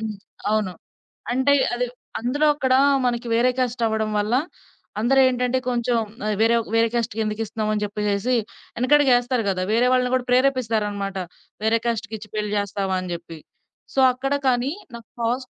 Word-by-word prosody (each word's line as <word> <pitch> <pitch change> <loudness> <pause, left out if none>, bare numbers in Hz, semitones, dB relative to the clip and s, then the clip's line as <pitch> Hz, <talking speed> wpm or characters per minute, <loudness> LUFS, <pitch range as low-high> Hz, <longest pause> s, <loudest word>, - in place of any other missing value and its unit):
హ్మ్. 220 -1 -4 0.4
అవును. 210 -4 0 0.6
అంటే 265 +2 +3 0.2
అది 245 0 -1 0.3
అందులో 270 +6 0
అక్కడ 260 -3 +1 0.3
మనకి 240 0 -2
వేరే 245 +2 +3
క్యాస్ట్ 245 -1 -1
అవ్వడం 220 0 -1
వల్ల 210 +3 -1 0.7
అందరేంటంటే 255 +1 +3
కొంచెం 240 0 0 0.3
ఆహ్, 215 - 0
వేరే 225 +1 +4
ఒ - - -7
వేరే 230 0 +4
క్యాస్ట్‌కి 230 -2 -1
ఎందుకిస్తున్నాము 215 0 -2
అని 210 - -1
జెప్పేసేసి 205 +3 -1 0.4
వెనకడుగేస్తారు 250 -2 +3
గదా! 185 -1 -1
వేరే 245 +2 +3
వాళ్ళని 250 0 +2
కూడా 255 -1 -1
ప్రేరేపిస్తారన్నమాట. 220 -7 +1 0.5
వేరే 220 +1 +3
క్యాస్ట్‌కిచ్చి 220 -2 -3
పెళ్ళి 210 -1 -2
జేస్తావా? 200 -1 -1
అని 180 -1 -6
జెప్పి. 170 -1 -8 0.5
సో 270 - 0
అక్కడ 270 +2 -2
కానీ 250 +2 +1 0.2
నాకు 230 -1 -11
పాస్ 245 +3 -1
235 Hz, 145 wpm, -23 LUFS, 215-250 Hz, 0.7 s, వేరే